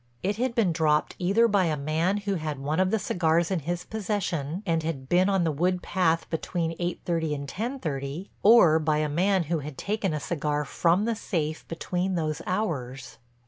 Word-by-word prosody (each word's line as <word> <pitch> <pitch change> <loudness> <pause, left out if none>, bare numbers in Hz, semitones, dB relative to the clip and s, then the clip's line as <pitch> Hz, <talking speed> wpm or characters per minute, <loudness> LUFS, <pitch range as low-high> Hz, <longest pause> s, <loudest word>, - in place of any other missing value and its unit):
It 200 +2 0
had 245 0 -1
been 215 -7 +3
dropped 155 -2 +1
either 200 +6 +3
by 200 -4 +2
a 155 -2 0
man 160 +7 0
who 200 -1 -2
had 155 -5 -3
one 145 +4 -2
of 185 0 +3
the 220 - +2
cigars 170 -3 +1
in 185 - +1
his 175 +4 -4
possession 190 -6 -3
and 165 -3 +1
had 150 -5 -4
been 180 +5 +3
on 195 -3 +2
the 165 - +1
wood 180 +4 0
path 165 -3 +1
between 165 0 -2
eight 175 0 -2
thirty 165 -3 0
and 140 0 -6
ten 235 - -3
thirty, 145 - -4
or 185 -8 +7
by 155 -1 +1
a 155 0 +1
man 185 +5 +2
who 165 +1 -1
had 145 -1 -8
taken 205 -2 -1
a 155 - -2
cigar 150 -1 -2
from 175 +8 +2
the 230 - +1
safe 160 -8 -3
between 180 +3 -2
those 155 -2 -2
hours. 140 - -3
170 Hz, 200 wpm, -27 LUFS, 155-190 Hz, -, or